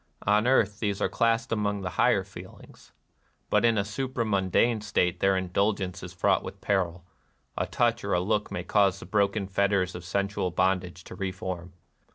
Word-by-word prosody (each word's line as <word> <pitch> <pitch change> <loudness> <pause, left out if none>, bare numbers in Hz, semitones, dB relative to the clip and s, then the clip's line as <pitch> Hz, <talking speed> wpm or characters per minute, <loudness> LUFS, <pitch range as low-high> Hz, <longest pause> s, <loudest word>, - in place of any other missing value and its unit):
On 105 +3 +3
earth 105 -5 +2
these 100 -3 -1
are - - +1
classed 115 +3 +1
among 105 -2 0
the 90 -2 -4
higher 110 0 +3
feelings. 95 - -13 0.6
But - - +3
in 115 -2 +3
a 100 - +2
supramundane 110 -2 0
state 95 -5 0
their 95 0 +3
indulgence 95 0 -1
is 90 - -8
fraught 90 - +2
with - - -8
peril: 90 -3 -1 0.5
a - - -1
touch - - +1
or - - -1
a 90 - +3
look 105 +3 0
may 90 - -3
cause 100 -1 +2
the - - -9
broken 100 +1 +1
fetters 100 -1 +1
of 90 - -7
sensual 100 +1 -1
bondage 90 0 -1
to - - -11
reform. 90 -2 -5
100 Hz, 175 wpm, -27 LUFS, 90-105 Hz, 0.6 s, On